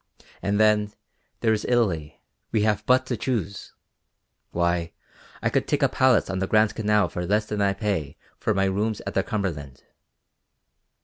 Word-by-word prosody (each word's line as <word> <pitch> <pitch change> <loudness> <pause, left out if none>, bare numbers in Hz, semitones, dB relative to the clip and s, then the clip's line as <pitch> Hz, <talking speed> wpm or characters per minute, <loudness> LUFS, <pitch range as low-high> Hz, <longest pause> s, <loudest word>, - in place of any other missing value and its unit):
And 100 +2 0
then, 105 -1 +3 0.5
there 110 - +3
is 105 - -2
Italy; 95 -12 0 0.3
we 110 -2 +2
have 105 -1 +1
but 130 +1 +4
to 130 - -2
choose. 105 -4 -3 0.7
Why, 85 -1 0 0.5
I - - +1
could - - 0
take - - +1
a - - +6
palace 130 -2 +3
on 95 -1 -3
the 95 - -1
Grand 110 +1 +3
Canal 105 -3 +2
for 90 - -5
less 105 +4 +1
than 105 -1 -3
I 100 -1 +2
pay 100 -9 -2 0.2
for 110 - 0
my 95 0 +2
rooms 105 +3 -1
at - - -4
the - - +2
Cumberland. 80 - -4
105 Hz, 170 wpm, -25 LUFS, 95-110 Hz, 0.7 s, a